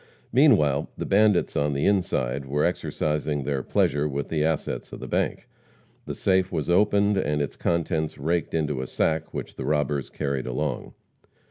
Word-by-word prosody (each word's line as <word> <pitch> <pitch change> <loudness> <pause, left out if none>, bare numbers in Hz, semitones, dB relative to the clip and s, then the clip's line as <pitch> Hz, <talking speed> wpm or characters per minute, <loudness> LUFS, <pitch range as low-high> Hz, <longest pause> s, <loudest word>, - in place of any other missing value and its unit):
Meanwhile, 100 - +4
the - - -3
bandits 105 -2 +3
on 70 0 +1
the 70 - 0
inside 70 -9 0
were 75 +2 +1
exercising 75 -1 -1
their 70 -1 -1
pleasure 70 +3 +1
with 70 0 -3
the 75 -2 0
assets 80 -1 -2
of - - -8
the - - -7
bank. - - -1 0.6
The - - -4
safe 95 -1 +1
was 80 +2 -1
opened 100 +2 +3
and 75 -5 0
its 70 -2 -2
contents 80 -2 -1
raked 85 +4 -1
into 75 -4 -1
a 65 - -5
sack 80 +4 -1
which - - -6
the - - -4
robbers 75 -1 0
carried 70 -2 -3
along. 65 +1 -3
75 Hz, 165 wpm, -25 LUFS, 70-85 Hz, 0.6 s, Meanwhile